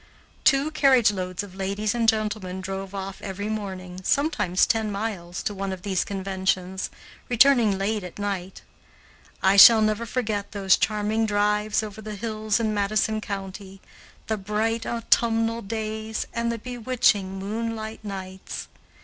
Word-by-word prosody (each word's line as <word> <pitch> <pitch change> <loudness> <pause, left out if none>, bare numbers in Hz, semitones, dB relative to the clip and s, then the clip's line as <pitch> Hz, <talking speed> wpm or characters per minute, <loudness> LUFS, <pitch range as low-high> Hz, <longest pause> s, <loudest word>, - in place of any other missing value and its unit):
Two 275 +3 +4
carriage 265 -7 +5
loads 185 -1 -4
of 200 -3 -11
ladies 200 +3 -2
and 230 -2 +3
gentlemen 210 -4 -1
drove 195 +1 -5
off 195 0 -6
every 200 +1 -4
morning, 190 -4 -5
sometimes 235 - +2
ten 220 -3 0
miles, 195 -4 -4
to 210 - -2
one 195 0 -3
of 185 -1 -6
these 190 -3 0
conventions, 190 -1 -2 0.4
returning 240 -4 +5
late 205 +1 -1
at 180 - -9
night. 195 -2 -4 0.8
I 190 +1 +4
shall 225 +2 +11
never 215 +2 +1
forget 215 -5 -2
those 195 -2 +4
charming 215 +1 0
drives 210 +1 +1
over 215 0 -7
the 215 0 -6
hills 215 0 -1
in 220 -2 0
Madison 215 +1 0
County, 195 -1 -7 0.5
the 220 - -1
bright 220 +3 -1
autumnal 230 0 +1
days, 220 +1 -4
and 235 0 -1
the 235 - -3
bewitching 225 -5 0
moonlight 220 +2 -4
nights. 190 -2 -7
210 Hz, 140 wpm, -25 LUFS, 195-225 Hz, 0.8 s, shall